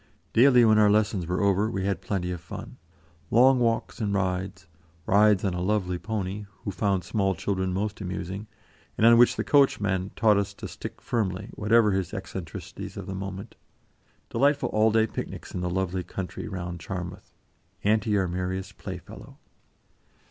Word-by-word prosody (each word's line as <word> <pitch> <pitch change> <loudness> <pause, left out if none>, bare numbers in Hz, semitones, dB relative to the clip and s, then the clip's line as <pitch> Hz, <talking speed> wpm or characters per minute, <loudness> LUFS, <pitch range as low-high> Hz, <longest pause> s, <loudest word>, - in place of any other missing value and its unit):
Daily, 125 0 +6
when 110 -1 +5
our 105 -1 +6
lessons 105 -4 +1
were 90 +3 -1
over, 100 +2 +2
we 95 -3 -2
had 100 -1 -1
plenty 90 -3 -2
of 90 -2 -5
fun; 85 - -9 0.5
long 130 +3 +5
walks 115 0 0
and 100 -2 0
rides, 95 -1 -2 0.4
rides 105 0 +4
on 95 - 0
a 90 - -3
lovely 90 -2 0
pony, 105 -1 -4 0.2
who 100 - -3
found 95 0 0
small 95 +1 0
children 95 +1 -1
most 105 +3 -3
amusing, 95 +2 -5 0.5
and 110 - +3
on 115 0 +8
which 120 - +6
the - - -1
coachman 100 -9 +2
taught 110 -2 +4
us 100 0 -2
to - - -7
stick - - -8
firmly, 95 -6 -2
whatever 105 0 +3
his 95 +1 -2
eccentricities 95 -4 -7
of - - -6
the 95 - -5
moment; 95 +2 -6 0.8
delightful 140 +4 +2
all 110 +1 +3
day 110 0 +4
picnics - - -7
in 90 - -3
the 90 - -1
lovely 95 0 -1
country 90 +1 -6
round 90 -3 -5
Charmouth, 90 +1 -7 0.5
Auntie 105 0 +2
our 95 -2 +1
merriest 95 +2 -4
playfellow. - - -9
100 Hz, 165 wpm, -26 LUFS, 95-110 Hz, 0.8 s, on